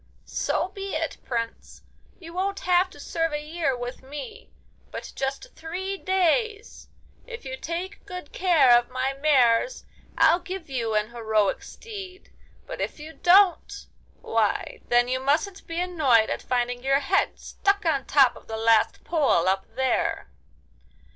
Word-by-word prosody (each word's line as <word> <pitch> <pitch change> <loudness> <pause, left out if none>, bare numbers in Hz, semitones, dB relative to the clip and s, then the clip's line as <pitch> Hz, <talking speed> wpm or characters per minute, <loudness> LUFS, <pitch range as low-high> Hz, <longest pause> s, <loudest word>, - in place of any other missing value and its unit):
'So - - -1
be 390 -2 -6
it, 320 -1 -2
Prince! 230 -2 -5 0.3
You 335 -2 -11
won't 390 +2 -2
have 365 +1 +3
to 290 - -15
serve 330 +2 -2
a 295 - -1
year 310 -5 -1
with 245 +1 -6
me, 435 - -9 0.4
but - - -8
just 275 - -4
three 370 +4 -4
days. 390 +4 0 0.4
If 460 - -9
you 260 0 -4
take 340 +6 -5
good 360 -6 -8
care 315 -10 +5
of 240 0 +2
my 255 +1 -1
mares, 275 - +2 0.3
I'll 345 - +5
give 360 -4 -7
you 230 -4 -1
an 210 +2 0
heroic 220 -4 0
steed. 390 -4 -10 0.3
But - - -7
if - - -4
you 310 +2 -9
don't—why, 365 +1 +1
then 240 0 +3
you 255 +1 -1
mustn't 310 +9 -1
be 330 +1 -3
annoyed 300 -11 +3
at - - -2
finding 245 0 -1
your 275 +1 +2
head 380 +8 +1
stuck 400 -1 -1
on 280 -5 +1
top 270 -4 +4
of - - -15
the 220 - -4
last 225 -1 +3
pole 285 - +2
up 190 +1 +1
there. 260 -1 0
310 Hz, 150 wpm, -25 LUFS, 250-370 Hz, 0.4 s, care